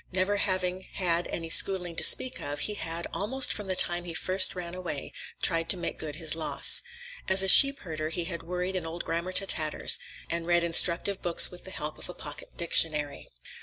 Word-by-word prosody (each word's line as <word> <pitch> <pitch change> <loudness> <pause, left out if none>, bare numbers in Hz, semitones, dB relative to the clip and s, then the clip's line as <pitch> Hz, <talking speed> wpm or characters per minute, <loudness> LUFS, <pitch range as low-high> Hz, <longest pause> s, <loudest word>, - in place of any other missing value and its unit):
Never 190 +2 0
having 185 -2 -2
had 175 -2 -1
any 165 -1 -6
schooling 180 -2 +4
to - - +5
speak 255 - +5
of, 145 +1 -5
he 210 - 0
had, 165 -3 -5
almost 260 +7 -1
from 210 -2 -8
the 185 - +1
time 175 -1 +2
he 170 -2 -7
first 185 +2 +1
ran 175 -1 -7
away, 180 -6 -6 0.3
tried 165 -2 +1
to 190 - +2
make 175 - -6
good 150 -2 -6
his 160 -1 -1
loss. 160 - +2 0.5
As 190 0 +5
a - - -1
sheep 275 +8 +7
herder 155 -3 -6
he 170 +1 -4
had 170 -1 -7
worried 180 +2 -5
an 175 -3 -4
old 170 +1 -6
grammar 170 +2 -4
to 195 - +1
tatters, 155 -5 +1 0.3
and 170 0 -4
read 175 0 +2
instructive 170 +3 +1
books 175 -1 +4
with 180 - -11
the - - -8
help 150 -4 -7
of - - -9
a 180 - -9
pocket 145 -1 -11
dictionary. 155 -3 0
175 Hz, 205 wpm, -27 LUFS, 165-185 Hz, 0.5 s, sheep